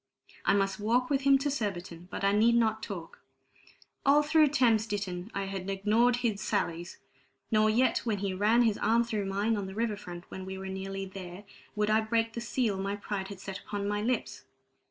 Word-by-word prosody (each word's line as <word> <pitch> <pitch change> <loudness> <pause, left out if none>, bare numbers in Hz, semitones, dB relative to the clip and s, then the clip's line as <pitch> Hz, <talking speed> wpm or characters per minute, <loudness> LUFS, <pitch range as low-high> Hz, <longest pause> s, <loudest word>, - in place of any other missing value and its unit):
I 195 - +4
must 195 -1 0
walk 245 +5 +1
with 275 -1 +2
him 275 0 +5
to 285 +1 -1
Surbiton, 180 -8 -4
but - - -5
I 200 - +4
need 225 +3 +4
not 220 -2 +2
talk; 180 -7 -7 0.8
all 290 +2 +5
through 310 +1 +5
Thames 240 -6 +3
Ditton 195 -2 -4
I 200 - -1
had 195 -1 -5
ignored 215 +5 +3
his 210 -4 0
sallies; 175 -4 -2 0.5
nor 215 0 +4
yet 235 +2 +3
when 220 -4 -1
he 195 -1 -2
ran 215 +5 +3
his 220 -3 +1
arm 230 +3 +3
through 215 -4 -2
mine, 205 +4 0
on 200 -2 -3
the 190 - -8
river 225 -1 0
front, 175 -4 -9
when 190 - -6
we 190 0 -6
were 190 0 -6
nearly 195 0 -4
there, 190 0 -9 0.3
would 210 0 +1
I 220 +1 +4
break 225 +1 0
the 235 - -4
seal 230 -4 -1
my 200 +1 -2
pride 200 -1 -4
had 200 -1 -9
set 195 0 -6
upon 200 -1 -4
my 205 0 -1
lips. 245 +3 -2
205 Hz, 205 wpm, -30 LUFS, 195-230 Hz, 0.8 s, him